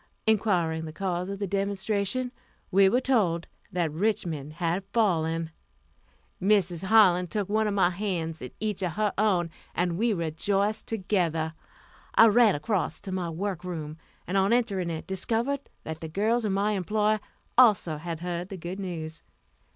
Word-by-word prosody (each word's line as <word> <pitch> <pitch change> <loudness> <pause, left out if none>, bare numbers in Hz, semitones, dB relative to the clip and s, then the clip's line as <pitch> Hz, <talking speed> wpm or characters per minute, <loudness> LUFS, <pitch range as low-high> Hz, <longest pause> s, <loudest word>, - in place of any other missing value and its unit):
Inquiring 180 -7 +1
the 155 - -6
cause 180 0 -2
of 200 - -4
the 200 - -2
demonstration, 200 +5 -1 0.4
we 195 0 +6
were 245 - +3
told 190 -11 +2 0.3
that 175 -4 0
Richmond 160 -5 -1
had 170 +3 -1
fallen. 165 -7 +1 0.9
Mrs. 190 -3 +2
Harlan 185 -4 +5
took 200 +3 -2
one 215 +1 +1
of 205 - -1
my 185 -3 +4
hands 175 -4 -3
in 125 - -6
each 210 -3 -2
of 180 -3 -1
her 210 +2 0
own, 185 -5 +2 0.2
and 175 0 0
we 235 +1 +2
rejoiced 195 +4 0
together. 175 -7 0 0.6
I 225 - +8
ran 220 -1 +5
across 170 0 -1
to 190 - -6
my 185 -2 -2
work 180 +1 -3
room, 160 -3 -5 0.3
and 185 +3 -1
on 195 +3 +3
entering 200 -8 +1
it, 160 -1 -4
discovered 235 +8 -1
that 160 0 -6
the 160 - -5
girls 220 +7 +1
in 210 - 0
my 200 +2 +1
employ 210 +2 +1 0.4
also 210 -10 +5
had 165 +1 -5
heard 175 +1 -3
the 195 - -6
good 175 +3 -6
news. 165 -4 -5
190 Hz, 160 wpm, -27 LUFS, 170-210 Hz, 0.9 s, I